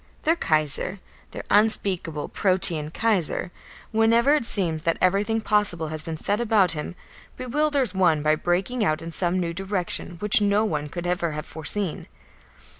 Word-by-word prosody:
Their 325 +2 +3
Kaiser, 155 - -1 0.3
their - - -8
unspeakable, 195 -7 +2
Protean 185 -5 +2
Kaiser, 190 -3 -1 0.4
whenever 230 +5 +3
it 300 -6 +1
seems 170 -8 -1
that 165 0 0
everything 205 +4 +1
possible 205 -7 0
has 155 0 -5
been 160 0 -6
said 205 +7 -1
about 210 -6 +3
him, 155 +2 -4 0.4
bewilders 270 -2 0
one 170 -6 +2
by 155 0 +3
breaking 180 +9 -1
out 155 -4 0
in 165 - -7
some 175 +2 0
new 170 -2 -2
direction 185 -1 -3
which 210 +3 +3
no 205 +1 +2
one 150 -7 -3
could 175 +3 -6
ever 175 -2 -1
have 150 0 -5
foreseen. 165 +3 -3
185 Hz, 155 wpm, -24 LUFS, 165-215 Hz, 0.4 s, Their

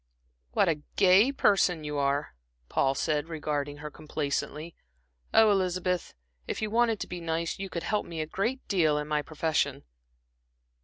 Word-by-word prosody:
"What - - +3
a 155 -3 0
gay 200 +6 +6
person 190 - +2
you 150 -1 -3
are!" 140 +1 0 0.4
Paul 135 0 +2
said, 150 +2 -1
regarding 145 -2 -3
her 150 - -5
complacently. 155 +2 -3 0.6
"Ah, 225 - +6
Elizabeth, 180 - 0 0.3
if - - -3
you 215 -1 -2
wanted 230 -2 +2
to - - -3
be 180 -1 -6
nice, 165 +1 -2
you 195 0 -4
could 170 -2 -4
help 210 -1 -1
me 165 -1 -6
a 155 - -1
great 230 - -2
deal 160 -7 +2
in 150 0 -3
my 150 -1 +1
profession." 155 +1 -1
165 Hz, 160 wpm, -28 LUFS, 150-195 Hz, 0.6 s, gay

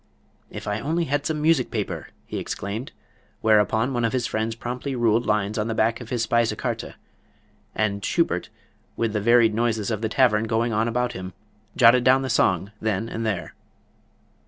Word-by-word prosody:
"If - - -8
I 105 +1 -1
only 165 +6 -1
had 145 -1 -1
some 155 -1 -2
music 155 -6 +3
paper!" 90 - -4 0.2
he - - -5
exclaimed, 110 +6 -5 0.5
whereupon 110 +3 +3
one 120 -1 -1
of 115 - 0
his 125 -2 0
friends 110 +1 -2
promptly 125 +3 -4
ruled 115 -1 +2
lines 105 0 0
on 105 - -1
the 115 - -2
back 115 +2 +1
of 120 - -9
his 120 -2 0
Speise 115 -1 +1
Karte, - - -4 0.8
and 100 -2 -1
Schubert, - - 0 0.5
with 115 -2 0
the 105 - 0
varied 115 0 +5
noises 110 -2 0
of 110 -1 -2
the 110 - -1
tavern 115 -2 +3
going 115 +1 0
on 110 +2 +1
about 125 +1 -1
him, 95 0 -7 0.4
jotted 120 +1 +6
down 130 +1 +4
the 130 - -2
song 95 -1 +2
then 110 +1 -1
and 115 0 -3
there. 100 -5 -3
115 Hz, 180 wpm, -24 LUFS, 105-120 Hz, 0.8 s, jotted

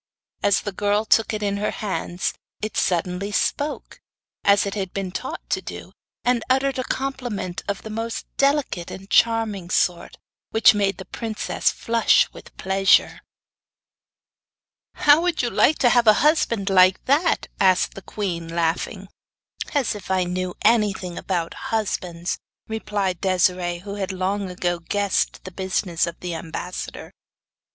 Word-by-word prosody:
As 200 -1 +3
the 205 - -4
girl 205 +2 0
took 225 +1 +3
it 215 -1 -3
in 200 0 0
her 210 +1 -1
hands 185 -3 -3 0.3
it 215 0 -4
suddenly 180 +3 0
spoke, 290 +8 -2 0.4
as 200 0 +4
it 200 - -3
had 190 -3 -4
been 195 -2 -3
taught 255 +8 -6
to - - +1
do, - - -9 0.3
and 245 -2 +2
uttered 265 0 +2
a - - 0
compliment 245 -10 -3
of 200 -1 -3
the 220 - -7
most 225 +1 -4
delicate 275 - +1
and 195 +1 -10
charming 225 -6 +2
sort, 175 -2 0 0.3
which 225 +2 +6
made 200 -1 0
the 190 - -8
princess 225 -2 -1
flush 230 0 +3
with - - -14
pleasure. 190 0 +3 1.7
'How 295 +2 +5
would 350 -5 0
you 240 - 0
like 305 - +4
to 245 - +4
have 240 -1 +3
a 215 - +9
husband 230 -10 +2
like 185 0 +5
that?' 295 +6 +2
asked 185 -2 +3
the 195 - -9
queen, 175 -4 -4
laughing. 170 +4 -2 0.7
'As 275 -5 +2
if 205 -2 -9
I 190 -1 +2
knew 180 0 -3
anything 205 -5 +2
about 175 -3 -2 0.2
husbands!' 180 -5 -2 0.3
replied 205 -5 -2
Desiree, 180 -2 +1
who 200 - -5
had 195 -2 -3
long 190 +1 -2
ago 175 -1 -1
guessed 200 +3 -1
the 185 - -8
business 185 -2 -1
of 170 - -7
the 180 -1 -4
ambassador. 165 +2 -6
200 Hz, 150 wpm, -23 LUFS, 185-225 Hz, 1.7 s, a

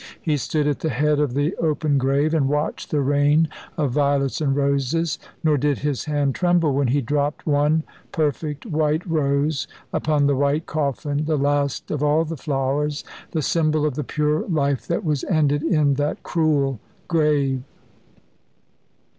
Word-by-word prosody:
He 155 -3 0
stood 150 +2 -1
at 145 -2 0
the 160 - -1
head 150 +3 +1
of 145 -4 0
the 145 +5 0
open 150 -3 +1
grave, 140 +4 +1
and 140 -4 +2
watched 150 +1 -2
the 150 - +1
rain 145 +3 +3 0.3
of 145 -4 0
violets 140 0 +1
and 140 -3 +1
roses, 140 +3 0 0.2
nor 155 -2 +3
did 145 +1 +1
his 145 -2 -2
hand 145 -3 0
tremble 175 -4 +2
when 140 0 +1
he 140 +4 +2
dropped 145 +4 -1
one 150 +1 +2 0.3
perfect 150 - -2
white 155 -3 0
rose 145 -3 0 0.3
upon 150 -2 +1
the 140 0 +3
white 145 +3 +1
coffin, 145 0 -2
the 155 -1 +1
last 140 0 0
of 150 - -2
all 150 +2 +3
the 165 +1 -4
flowers, 145 +1 -1 0.3
the 160 -3 -2
symbol 155 0 +1
of 150 - 0
the 150 - -3
pure 150 +3 0
life 140 -6 0
that 170 +3 -1
was 150 -4 0
ended 145 -4 +2
in 155 -3 +2
that 145 +2 -2
cruel 145 - +1 0.3
grave. 150 -5 +1
145 Hz, 165 wpm, -22 LUFS, 140-155 Hz, 0.3 s, rain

